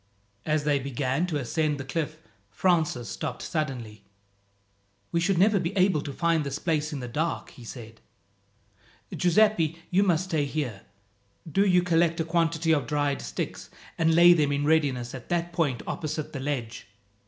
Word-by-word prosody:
As 155 -1 +1
they 145 -1 +2
began 135 +4 -1
to 160 -4 -1
ascend 150 +3 -1
the - - -4
cliff, 155 +2 -3 0.3
Francis 160 - +1
stopped 95 - -5
suddenly. 125 -10 -4 1.1
"We 170 - +1
should 180 +2 +1
never 200 +3 +4
be 180 +3 -3
able 185 -5 +3
to 145 - -6
find 165 +2 +1
this 140 -1 -3
place 155 -1 -1
in 145 -3 -4
the 125 - -5
dark," 155 +7 -2
he 125 - -13
said. 115 -1 -10 1.1
"Giuseppi, 175 -3 +3
you 185 +2 +4
must 180 -4 +2
stay 160 -6 0
here. 135 -9 -3 0.7
Do 195 +7 +3
you 180 -1 +4
collect 170 -1 +2
a 165 - 0
quantity 165 -1 +1
of 145 -3 0
dried 145 -1 0
sticks, - - -5 0.3
and 165 0 +2
lay 175 +1 +8
them 150 -4 +2
in 145 0 0
readiness 140 -6 +1
at 130 -3 -9
that 175 0 -1
point 150 -9 0
opposite 155 0 -4
the 140 - -4
ledge. 130 -6 -4
155 Hz, 165 wpm, -27 LUFS, 140-170 Hz, 1.1 s, lay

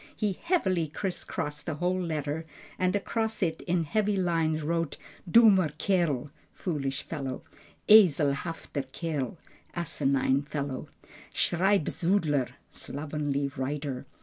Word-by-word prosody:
He 205 -4 -1
heavily 190 - +1
criss 180 +5 -3
crossed 150 +2 -4
the 160 - -1
whole 180 +4 0
letter, 155 -1 -3 0.3
and 185 +1 +2
across 220 +1 -1
it 160 -2 -1
in 175 -1 +2
heavy 205 +5 +1
lines 165 -4 +1
wrote, 165 0 -1 0.3
"Dummer 200 -6 +6
Kerl" 155 -9 +1 0.2
(foolish 140 -6 -3
fellow), 135 -5 -5 0.4
"Eselhafter 155 -6 +4
Kerl" 155 -1 -3 0.4
(asinine 140 -5 +1
fellow), 140 -2 -4 0.5
"Schreibsudler" 175 -5 +2 0.2
(slovenly 145 -1 -2
writer). 140 -1 -3
160 Hz, 105 wpm, -29 LUFS, 145-185 Hz, 0.5 s, Dummer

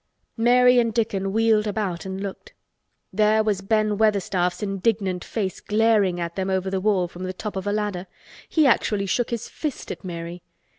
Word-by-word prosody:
Mary 250 +2 +5
and 230 -2 0
Dickon 195 -4 0
wheeled 220 0 +3
about 195 -4 -3
and 190 0 -5
looked. 200 - -7 0.6
There 215 +2 +3
was 205 -3 0
Ben 215 0 +1
Weatherstaff's 195 -3 +1
indignant 195 -2 -1
face 195 -5 -3
glaring 210 -4 +2
at 170 0 -4
them 190 0 -2
over 190 0 -1
the 190 -1 -1
wall 190 -3 +2
from 175 +1 -11
the 185 0 -3
top 210 +2 -6
of 190 +1 -4
a - - +1
ladder! 205 -3 -2 0.4
He 315 -2 +3
actually 210 -5 +2
shook 235 +5 0
his 235 -1 -3
fist 300 -4 -5
at - - -7
Mary. 170 -1 -6
205 Hz, 180 wpm, -24 LUFS, 190-220 Hz, 0.6 s, Mary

